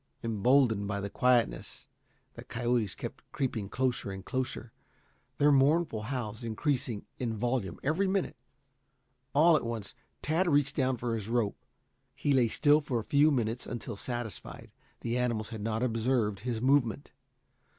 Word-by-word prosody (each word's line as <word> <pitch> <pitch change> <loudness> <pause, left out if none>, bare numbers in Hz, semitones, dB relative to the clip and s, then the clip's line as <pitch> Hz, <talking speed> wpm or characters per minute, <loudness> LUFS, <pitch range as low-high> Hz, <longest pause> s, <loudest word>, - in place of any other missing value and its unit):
Emboldened 115 -1 +3
by 100 -1 -2
the 100 0 -4
quietness, 125 -2 +1 0.5
the - - -10
coyotes 120 -4 -1
kept - - -7
creeping 110 -7 -2
closer 125 -3 -1
and 95 0 -7
closer, 130 -3 -3 0.7
their 145 +1 +5
mournful 140 -3 +3
howls 110 -2 -4
increasing 120 -1 -1
in 115 -3 -2
volume 120 -5 -1
every 160 +8 +1
minute. 190 -1 0 1.0
All 160 +3 +6
at 150 - +1
once 115 -3 -4 0.3
Tad 170 +4 +1
reached 145 -2 +2
down 130 -2 +1
for 120 0 -2
his 110 -2 -4
rope. 115 -4 0 0.5
He 145 - +1
lay 125 -3 +4
still 145 +6 +4
for 135 -4 -2
a 115 - -2
few 145 +6 +4
minutes 120 -4 -1
until 120 -2 -5
satisfied 120 +1 -6
that - - -37
the 120 +1 -1
animals 115 -3 -1
had 110 -3 -6
not 110 +2 -1
observed 115 -3 +1
his 115 0 -3
movement. 135 -1 +2
120 Hz, 150 wpm, -30 LUFS, 110-135 Hz, 1.0 s, All